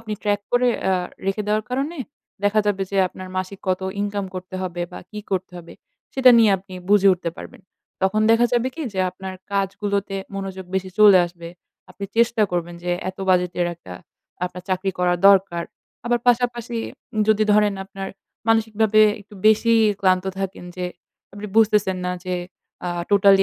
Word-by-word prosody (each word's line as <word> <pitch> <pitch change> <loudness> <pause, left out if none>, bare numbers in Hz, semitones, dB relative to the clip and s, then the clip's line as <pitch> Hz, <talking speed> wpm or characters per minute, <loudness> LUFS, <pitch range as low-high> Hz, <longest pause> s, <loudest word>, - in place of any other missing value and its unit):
আপনি 220 -1 -6
ট্র্যাক 205 -1 +1
করে 245 0 +4 0.2
আ - - +3 0.3
রেখে 195 +2 0
দেওয়ার 210 0 0
কারণে 275 +7 -2 0.5
দেখা 210 +1 +3
যাবে 200 -2 +1
যে 200 - -2
আপনার 185 +1 -10
মাসিক 185 +1 -3
কত 185 0 +1 0.2
ইনকাম 205 -1 -2
করতে 185 0 -7
হবে? 175 -1 -3
বা - - -7
কি 210 - -7
করতে 185 -1 -2
হবে? 170 -1 -12 0.4
সেটা 260 -1 +7
নিয়ে 225 -2 +6
আপনি 185 0 -13 0.2
বুঝে 200 -1 +6
উঠতে 170 -1 -4
পারবেন। - - -10 0.4
তখন 190 +3 +2
দেখা 230 +1 +5
যাবে 245 +1 +2
কি, 325 - -5
যে 190 - 0
আপনার 190 +1 -8 0.2
কাজগুলোতে 200 0 -1 0.2
মনোযোগ 190 -1 -5
বেশি 190 0 -1
চলে 205 -3 +8
আসবে। 170 -1 -10 0.4
আপনি 200 - -7
চেষ্টা 230 -1 +3
করবেন 175 -1 -2
যে 180 - -1 0.2
এত 190 - -26
বাজেটের 180 -1 +2
একটা 125 - -12 0.5
আপনার 180 0 -6
চাকরি 185 +1 0
করা 180 0 +2
দরকার। 190 -3 +3 0.4
আবার 240 0 +2
পাশাপাশি 240 -1 +1 0.5
যদি 215 0 +4
ধরেন 210 -1 +3
আপনার 195 0 -7 0.4
মানসিকভাবে 220 -1 +3 0.2
একটু 205 +1 -16
বেশিই 225 +1 +5 0.2
ক্লান্ত 185 -1 +3 0.2
থাকেন 195 -2 -4
যে 180 - -3 0.5
আপনি 205 +1 -7
বুঝতেছেন 210 -4 +3
না 180 - -1
যে 185 - -2 0.5
আ - - -1 0.2
টোটালি 200 -1 +6
200 Hz, 165 wpm, -22 LUFS, 185-215 Hz, 0.5 s, চলে